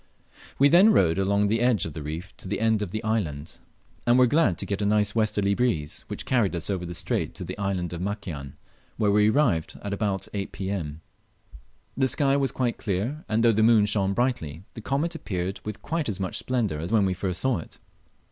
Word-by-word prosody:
We 140 - +6
then 185 +9 +6
rowed 85 - +3
along 100 +1 +2
the 110 +3 +1
edge 120 -3 +2
of 80 - -6
the 80 - -6
reef 80 +7 -6
to - - -8
the - - -2
end 110 -1 +2
of 105 - -3
the 110 +4 -4
island, 85 -10 -2 0.5
and 120 +1 +5
were 125 - +6
glad 120 - +2
to - - -3
get 100 0 -3
a - - +1
nice 105 -1 +2
westerly 105 -3 +1
breeze, 100 -11 -1
which - - -6
carried 115 -8 +1
us 85 +4 -3
over 90 -3 -3
the 90 - -4
strait - - -1
to - - -6
the - - -6
island 95 -4 -2
of 85 - -5
Makian, 90 -9 -5 0.4
where 105 -2 +2
we 105 +1 +4
arrived 110 - +1
about 100 -1 -1
8 100 -2 -3
P.M, 90 -6 -4 0.9
The 130 -1 +2
sky 140 0 +2
was 135 -1 +1
quite 125 -3 -1
clear, 110 - -2
and 110 +1 +1
though 115 - +6
the 110 0 +1
moon 110 -2 +5
shone 100 -2 +1
brightly, 95 - -1
the 115 - -8
comet 140 +8 -1
appeared 95 - -4
with 105 -1 -7
quite 160 -5 -2
as 100 - -3
much 95 -2 -2
splendour 115 -11 -1
as 85 +4 -5
when 110 -3 +4
we 95 - +1
first 90 -1 -2
saw 130 -8 +1
it. - - -11
105 Hz, 215 wpm, -26 LUFS, 90-120 Hz, 0.9 s, We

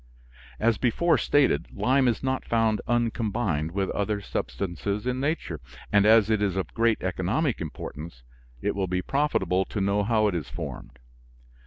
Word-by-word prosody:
As 115 -1 +2
before 160 +8 +2
stated, 135 - +2
lime 130 - +2
is 120 0 0
not 130 0 -1
found 115 -2 +1
un 120 -1 +2
combined 100 -10 -1
with 95 +1 -1
other 105 +1 -1
substances 100 +2 -3
in 125 0 -1
nature. 150 - -2 0.3
And 105 0 +5
as 110 -1 +6
it 110 -1 +2
is 100 -3 0
of 95 -5 -3
great 115 -1 +1
economic 100 - 0
importance, 75 -3 -7 0.4
it - - +1
will 95 -1 -1
be 90 0 -1
profitable 135 -10 +1
to 105 - -4
know 100 +1 +1
how 110 0 +2
it 100 - 0
is 80 -8 -3
formed. 75 -6 -7
105 Hz, 165 wpm, -26 LUFS, 90-120 Hz, 0.4 s, as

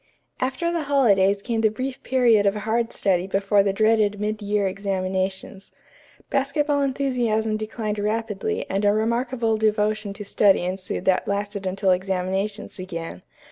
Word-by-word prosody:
After 265 +6 -1
the 335 -3 -2
holidays 200 -8 +3
came 230 -3 -1
the 220 - +4
brief 255 +4 -5
period 235 -5 +3
of 200 - +2
hard 225 +2 -1
study 185 -2 0
before 200 +1 +2
the 195 0 +1
dreaded 215 0 +2
mid 215 +1 -2
year 205 -1 0
examinations. 190 0 -3 0.6
Basketball 285 +1 +1
enthusiasm 245 -6 0
declined 215 -1 -3
rapidly 210 -1 -2
and 195 +2 -1
a 205 0 +4
remarkable 235 +1 0
devotion 215 -1 0
to 205 +1 -8
study 195 -2 +3
ensued 185 0 -4
that 185 -1 +2
lasted 200 -1 -2
until 190 +1 +1
examinations 190 +3 -2
began. 170 - -6
210 Hz, 140 wpm, -23 LUFS, 195-230 Hz, 0.6 s, the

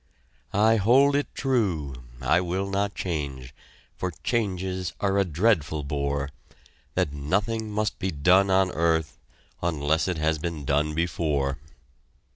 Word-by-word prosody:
I 110 +3 +4
hold 130 +7 +5
it 145 -2 +1
true 100 - 0 0.3
I 80 +7 +3
will 90 +2 -2
not 100 +1 0
change, 70 -7 -4 0.4
For 90 - -2
changes 95 -5 -1
are 100 0 +1
a - - +5
dreadful 80 -4 +1
bore 70 0 -2 0.6
That 70 - +1
nothing 100 +10 -1
must 105 0 -1
be 95 - -1
done 95 +5 +4
on 95 -1 +3
earth 80 -2 0 0.4
Unless 80 -1 +1
it 90 -3 -1
has 80 0 +1
been 80 -3 -4
done 75 +3 +1
before. 75 -5 0
85 Hz, 130 wpm, -26 LUFS, 75-100 Hz, 0.6 s, hold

